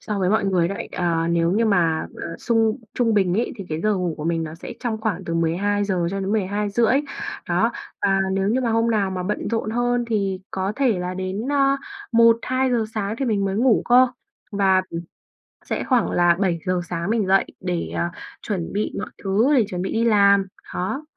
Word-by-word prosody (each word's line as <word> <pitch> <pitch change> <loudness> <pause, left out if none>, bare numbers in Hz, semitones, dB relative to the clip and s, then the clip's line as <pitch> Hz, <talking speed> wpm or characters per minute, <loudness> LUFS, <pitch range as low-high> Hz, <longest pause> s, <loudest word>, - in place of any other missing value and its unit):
so 210 -2 -3
với 185 0 +1
mọi 215 - +2
người 180 -3 +2
đấy. 200 - -5
Ờ, 165 -2 0
nếu 170 0 +2
như 225 +4 +2
mà, 170 -7 +2 0.2
à, 165 - -5
sung 225 -2 +1 0.2
trung 230 -3 +2
bình 190 -3 +2
ấy, 235 +3 0
thì 195 - -7
cái 155 +1 -3
giờ 215 +2 +2
ngủ 180 -3 -1
của 150 - -6
mình 165 -1 0
nó 160 0 -6
sẽ 165 - -8
trong 230 -3 -2
khoảng 195 -5 -2
từ 165 - -3
12:00 185 +2 0
cho 195 - -3
đến 195 +1 -2
12:30. 210 +5 +1 0.5
Đó, - - +2 0.3
và 195 -1 +3
nếu 195 +1 0
như 250 +4 +2
mà 240 - 0
hôm 225 +1 +2
nào 200 -3 +1
mà 185 -1 -3
bận 210 +3 -2
rộn 225 -2 -1
hơn 245 +1 0
thì 195 -4 -1
có 190 +2 -2
thể 250 -9 +2
là 180 +1 -3
đến, 190 +6 -3
ơ, 275 -1 +3 0.4
1:00-2:00 235 +1 +3
sáng 210 -1 -2
thì 270 - 0
mình 210 -5 +1
mới 195 0 -1
ngủ 240 -1 +3
cơ, 250 +1 +7 0.5
và, 190 -2 +3
ừm, 165 - -4 0.7
sẽ - - -2
khoảng 250 -4 +1
là 175 -1 +4
7:00 180 -1 0
sáng 170 +2 -3
mình 220 -4 +1
dậy 195 +1 +4 0.2
để, 180 -2 -2
ờ, - - 0 0.4
chuẩn 190 -5 -4
bị 210 +1 -1
mọi - - -5
thứ, 215 +9 +2
để 230 -5 +4
chuẩn 180 -1 -3
bị 190 - -3
đi 230 - +1
làm, 200 -3 +5 0.3
đó. 230 +12 -3
200 Hz, 210 wpm, -22 LUFS, 180-225 Hz, 0.7 s, cơ